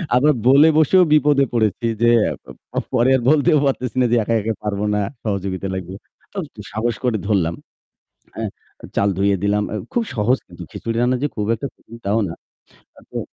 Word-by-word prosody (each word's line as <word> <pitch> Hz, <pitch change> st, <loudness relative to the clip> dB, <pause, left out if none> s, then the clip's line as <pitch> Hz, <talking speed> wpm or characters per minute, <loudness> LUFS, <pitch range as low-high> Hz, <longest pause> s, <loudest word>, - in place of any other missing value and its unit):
আবার 150 Hz, +4 st, +4 dB
বলে 140 Hz, +4 st, +7 dB
বসেও 180 Hz, +4 st, +5 dB
বিপদে 145 Hz, -2 st, +4 dB
পড়েছি 115 Hz, 0 st, +1 dB
যে 120 Hz, -, +5 dB, 0.2 s
অ্যা -, -, -1 dB
প -, -, -16 dB, 0.2 s
পরে 120 Hz, +3 st, +3 dB
আর 125 Hz, -, -4 dB
বলতেও 155 Hz, +1 st, +4 dB
পারতেছি 130 Hz, -2 st, -1 dB
না -, -, +4 dB
যে 120 Hz, -, +4 dB
একা, 115 Hz, -, -1 dB
একা 110 Hz, +2 st, -1 dB
পারবো 105 Hz, 0 st, -2 dB
না, 105 Hz, -, +1 dB, 0.2 s
সহযোগিতা 95 Hz, -2 st, -2 dB
লাগবে। 95 Hz, 0 st, -6 dB, 0.4 s
তো 200 Hz, -, -10 dB, 0.2 s
ত -, -, -33 dB, 0.2 s
সাহস 115 Hz, +2 st, -1 dB
করে 120 Hz, -3 st, +1 dB
ধরলাম। 90 Hz, -6 st, +1 dB, 0.8 s
অ্যা -, -, -4 dB, 0.5 s
চাল 100 Hz, -, +3 dB
ধুয়ে 100 Hz, 0 st, +2 dB
দিলাম। 105 Hz, +1 st, +2 dB
অ্যা -, -, -3 dB, 0.2 s
খুব 240 Hz, -, +1 dB
সহজ 120 Hz, +3 st, +2 dB
কিন্তু -, -, -12 dB
খিচুড়ি 115 Hz, 0 st, -4 dB
রান্না 125 Hz, +1 st, +2 dB
যে 145 Hz, -, +1 dB
খুব 105 Hz, -2 st, -1 dB
একটা 115 Hz, +5 st, -5 dB
কঠিন 115 Hz, -, -14 dB
তাও 105 Hz, +3 st, +2 dB
না। 85 Hz, -, -6 dB, 0.6 s
আ -, -, -14 dB
তো -, -, -4 dB
115 Hz, 195 wpm, -20 LUFS, 105-135 Hz, 0.8 s, বলে